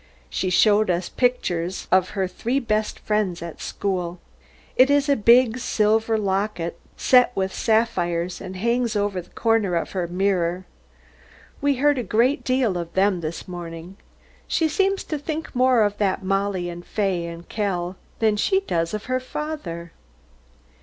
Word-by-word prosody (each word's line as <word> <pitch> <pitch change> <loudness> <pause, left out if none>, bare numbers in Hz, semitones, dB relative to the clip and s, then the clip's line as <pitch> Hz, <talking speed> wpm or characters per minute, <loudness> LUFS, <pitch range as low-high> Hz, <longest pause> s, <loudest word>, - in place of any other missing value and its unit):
She 185 - -1
showed 210 +2 +4
us 175 0 0
the - - -28
picture 190 -9 +1 0.2
of 185 0 +4
her 190 -1 +1
three 240 +8 -1
best 215 -4 -1
friends 205 -5 -1
at 170 -2 -8
school. 180 -3 -3 0.6
It 260 +2 +6
is 285 0 +3
in 285 - +4
a 270 - -3
big 240 +2 +5
silver 220 -1 +2
locket 195 -4 -2 0.2
set 250 -1 +5
with 190 0 -1
sapphires, 180 -6 0
and 185 - -7
hangs 235 +3 0
over 205 -2 0
a - - -4
corner 220 0 0
of 170 - -2
her 180 -3 -2
mirror. 180 -1 0 1.0
We 285 0 +2
heard 285 +1 +2
a - - -2
great 235 +7 +2
deal 255 -8 +1
of 170 -1 -6
them 190 -2 +2
this 160 +1 -5
morning. 175 0 -8 0.5
She 325 - +2
seems 390 +5 +1
to 305 - -4
think 315 +2 -5
more 255 -2 +4
of 205 0 -1
that 195 -1 0
Mollie 195 -1 0
and 175 0 -7
Fay 190 -5 -1
and 170 0 -9
Kell 185 -4 -2 0.2
than 215 -2 +2
she 385 - +2
does 165 - -1
of 210 - -6
her 255 0 0
father. 255 - -5
205 Hz, 165 wpm, -23 LUFS, 180-245 Hz, 1.0 s, It